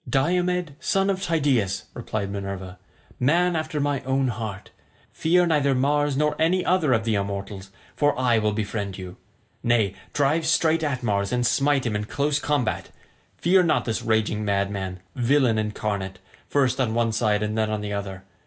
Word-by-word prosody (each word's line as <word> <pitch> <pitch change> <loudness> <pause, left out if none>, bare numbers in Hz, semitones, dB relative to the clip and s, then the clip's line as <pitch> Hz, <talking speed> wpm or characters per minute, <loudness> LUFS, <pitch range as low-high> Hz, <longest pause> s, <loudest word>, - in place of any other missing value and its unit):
"Diomed, 175 +3 +1
son 195 +3 +1
of 190 -1 -3
Tydeus," 135 - +1
replied 110 -4 -4
Minerva, 100 -2 -6 0.4
"man 170 +7 +3
after 155 -1 -2
my 145 -2 0
own 130 0 0
heart, 110 -4 -6 0.4
fear 175 +2 +3
neither 145 -5 +2
Mars 145 +1 +1
nor 150 +1 +1
any 180 +3 +2
other 175 -6 +2
of 115 -2 +2
the 115 -1 0
immortals, 100 -1 -4 0.3
for 145 -2 +2
I 120 -3 +3
will 105 -1 +1
befriend 105 -2 -3
you. 90 -2 -8 0.4
Nay, 115 -5 +2 0.2
drive 150 +3 +1
straight 165 0 +3
at 130 -5 -2
Mars, 100 -3 0
and 125 -1 +1
smite 140 +2 +2
him 115 -3 -1
in 105 0 -2
close 145 +5 0
combat; 145 -5 -1 0.5
fear 185 +2 +4
not 170 -3 +1
this 115 -2 -1
raging 110 -1 0
madman, 100 -2 -2
villain 125 -2 +2
incarnate, 105 -3 -3 0.3
first 135 -2 +2
on 115 -3 0
one 115 -1 +2
side 105 -2 +1
and 105 0 -2
then 110 -1 +1
on 110 -1 -2
the 105 0 -4
other. 95 -2 -5
120 Hz, 170 wpm, -24 LUFS, 105-145 Hz, 0.5 s, fear